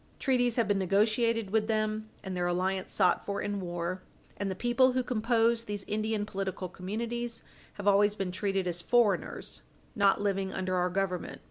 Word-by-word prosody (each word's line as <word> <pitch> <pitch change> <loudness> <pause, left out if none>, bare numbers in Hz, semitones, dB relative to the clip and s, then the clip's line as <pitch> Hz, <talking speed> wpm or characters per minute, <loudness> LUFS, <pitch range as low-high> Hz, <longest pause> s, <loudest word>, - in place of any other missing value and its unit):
Treaties 245 -3 +2
have 235 -3 +2
been 205 -1 +2
negotiated 215 +3 +2
with 215 0 +2
them, 215 -1 -1
and 190 -2 -4
their 175 -1 0
alliance 185 +2 -1
sought 180 -3 +2
for 200 0 -3
in 205 -1 -2
war, 175 0 -3 0.3
and 200 - -2
the 190 - -3
people 250 +4 +3
who 255 0 +1
compose 230 -1 +2
these 205 -2 -4
Indian 215 0 -1
political 195 -2 -3
communities 230 +6 -4 0.3
have 205 0 -6
always 205 +1 +5
been 195 -3 -2
treated 195 0 -1
as 175 -1 -2
foreigners 210 -1 +1 0.3
not 200 -3 +4
living 195 -1 0
under 185 0 -2
our 180 0 +2
Government. 185 -1 -2
205 Hz, 170 wpm, -30 LUFS, 190-225 Hz, 0.3 s, always